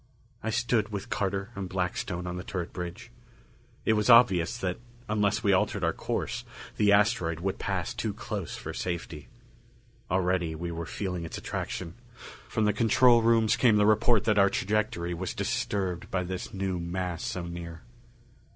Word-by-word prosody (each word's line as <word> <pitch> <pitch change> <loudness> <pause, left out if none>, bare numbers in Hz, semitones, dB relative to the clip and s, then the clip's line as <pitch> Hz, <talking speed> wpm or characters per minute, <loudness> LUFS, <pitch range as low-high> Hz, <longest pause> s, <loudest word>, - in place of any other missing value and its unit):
I 110 - -2
stood 115 -1 +1
with 100 -2 -6
Carter 95 +2 -1
and 100 -3 -5
Blackstone 90 -1 -2
on 90 0 -4
the 90 - -5
turret 90 -3 -4
bridge. 90 -1 -6 0.7
It 110 - +4
was 105 +2 +1
obvious, 115 -4 +6
that 90 -5 -2 0.3
unless 105 +1 +1
we 100 -2 +4
altered 95 - +1
our - - +2
course, - - -3 0.3
the 105 -1 +4
asteroid 100 -6 +3
would 95 +1 -2
pass 95 +3 -2
too 115 -3 -2
close 100 -2 -5
for - - -6
safety. 85 -6 -4 0.8
Already 90 -2 +1
we 85 +2 -4
were 85 0 -5
feeling 90 -4 -3
its 80 - -6
attraction; - - -4 0.5
from 110 - 0
the 105 - +3
control 115 +3 +5
rooms 115 -1 +4
came 115 -4 +4
the 105 0 +4
report 110 +1 +4
that 105 -2 +3
our 100 0 +6
trajectory 100 -4 -1
was 90 +6 -4
disturbed 100 -5 -2
by 90 -1 0
this 90 0 -5
new 95 -2 -2
mass 85 0 -3
so 90 -2 -3
near. 85 -1 -7
95 Hz, 165 wpm, -28 LUFS, 90-110 Hz, 0.8 s, obvious